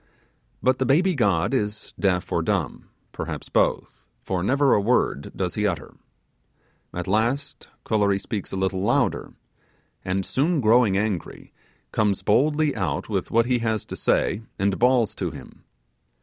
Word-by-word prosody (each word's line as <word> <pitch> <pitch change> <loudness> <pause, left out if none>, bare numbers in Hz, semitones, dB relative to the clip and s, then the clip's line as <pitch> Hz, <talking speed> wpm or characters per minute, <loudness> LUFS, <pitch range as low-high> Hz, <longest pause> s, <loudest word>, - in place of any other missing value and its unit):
But 130 0 +2
the 130 - +1
baby 175 +8 +3
god 100 - +1
is 105 -4 -2
deaf 90 -3 0
or - - +1
dumb, - - -2 0.2
perhaps - - -6
both, - - 0 0.2
for 95 -2 -2
never 135 +8 +3
a 105 - +3
word 100 - 0
does, 90 -2 -2
he 105 -1 0
utter. 85 -7 -4 1.0
At 90 - -4
last 115 +8 -1 0.2
Kolory 100 -3 +2
speaks 105 0 -5
a - - -4
little 95 0 -1
louder, 100 - 0 0.7
and 95 +1 -1
soon 155 +4 +1
growing 110 -4 +4
angry, 100 -4 -3 0.4
comes 105 -3 0
boldly 150 +6 +2
out 90 -9 -2
with - - -2
what 115 0 +3
he 125 0 +1
has 110 -2 -1
to - - -7
say 100 - +1 0.2
and 100 0 0
bawls 125 -2 +3
to - - -3
him. - - -13
105 Hz, 150 wpm, -24 LUFS, 95-130 Hz, 1.0 s, growing